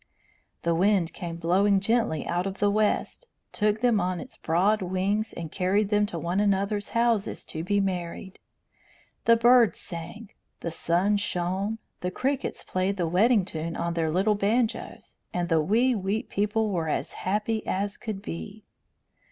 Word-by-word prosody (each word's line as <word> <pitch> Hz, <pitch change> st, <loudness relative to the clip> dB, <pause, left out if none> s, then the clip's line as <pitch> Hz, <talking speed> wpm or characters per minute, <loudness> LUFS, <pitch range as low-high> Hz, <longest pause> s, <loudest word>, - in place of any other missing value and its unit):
The 170 Hz, -, +2 dB
wind 185 Hz, -1 st, +2 dB
came 170 Hz, -2 st, -6 dB
blowing 190 Hz, +4 st, +3 dB
gently 210 Hz, -6 st, 0 dB
out 175 Hz, +2 st, -1 dB
of 195 Hz, 0 st, -5 dB
the 205 Hz, -1 st, +2 dB
West, 215 Hz, -, 0 dB, 0.2 s
took 210 Hz, 0 st, +1 dB
them 240 Hz, -4 st, +3 dB
on 180 Hz, 0 st, -1 dB
its -, -, -9 dB
broad 195 Hz, +6 st, +1 dB
wings, 190 Hz, +4 st, -1 dB
and 165 Hz, -2 st, -7 dB
carried 195 Hz, +2 st, +1 dB
them 210 Hz, 0 st, +2 dB
to 175 Hz, -, -5 dB
one 170 Hz, +4 st, -1 dB
another's 205 Hz, 0 st, +1 dB
houses 230 Hz, -3 st, +1 dB
to 160 Hz, -, -3 dB
be 205 Hz, +3 st, +1 dB
married. 185 Hz, 0 st, -3 dB, 0.9 s
The 230 Hz, 0 st, +6 dB
birds 240 Hz, -1 st, +5 dB
sang, 175 Hz, +6 st, -8 dB, 0.3 s
the 170 Hz, -, -3 dB
sun 180 Hz, +5 st, +1 dB
shone, 195 Hz, +2 st, -2 dB, 0.2 s
the 180 Hz, -, -2 dB
crickets 270 Hz, +8 st, -2 dB
played 185 Hz, +2 st, -1 dB
the 175 Hz, -2 st, 0 dB
wedding 205 Hz, +4 st, +3 dB
tune 165 Hz, -2 st, -4 dB
on 170 Hz, 0 st, -2 dB
their 165 Hz, -1 st, 0 dB
little 190 Hz, +6 st, +2 dB
banjos, 215 Hz, +3 st, -1 dB, 0.2 s
and 175 Hz, 0 st, -1 dB
the 165 Hz, -2 st, +3 dB
wee 230 Hz, +10 st, +3 dB
wheat 205 Hz, 0 st, -2 dB
people 210 Hz, +1 st, 0 dB
were 165 Hz, -4 st, -1 dB
as -, -, -2 dB
happy 210 Hz, +3 st, -1 dB
as 200 Hz, +2 st, -1 dB
could 210 Hz, -4 st, -6 dB
be. 205 Hz, +4 st, -7 dB
195 Hz, 160 wpm, -27 LUFS, 175-215 Hz, 0.9 s, The